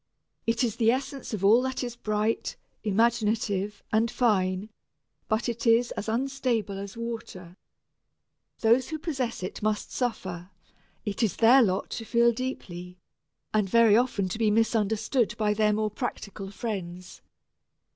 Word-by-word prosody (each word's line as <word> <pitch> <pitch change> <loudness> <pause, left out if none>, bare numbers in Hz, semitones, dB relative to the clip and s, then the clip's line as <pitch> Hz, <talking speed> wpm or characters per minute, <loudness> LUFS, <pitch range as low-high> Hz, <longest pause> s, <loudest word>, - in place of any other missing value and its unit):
It 230 +1 +2
is 230 -2 -1
the 225 -2 +3
essence 270 +2 -2
of 200 -3 -2
all 225 +5 +6
that 260 0 -2
is 240 -1 -4
bright, 215 0 -1 0.3
imaginative, 210 -2 +1
and 225 +2 +2
fine, 200 -4 +1 0.6
but 220 +2 0
it 235 0 -3
is 230 +1 +4
as 215 - -4
unstable 235 -4 -1
as 200 +2 -7
water. 225 -7 -6 1.1
Those 235 +3 +3
who 315 - -3
possess 270 - -3
it 185 - -5
must 215 0 -1
suffer 185 -8 -3 0.6
it 205 +2 -3
is 215 -6 +1
their 245 +4 +6
lot 195 -4 0
to 225 - -4
feel 235 +1 +4
deeply, 180 -8 -6 0.6
and 210 -3 +2
very 230 0 +6
often 225 -5 +1
to 220 - -4
be 220 -2 +3
misunderstood 220 +2 +1
by 210 -1 +2
their 210 0 +2
more 215 0 0
practical 200 -4 -5
friends. 185 -4 -6
220 Hz, 145 wpm, -27 LUFS, 200-235 Hz, 1.1 s, all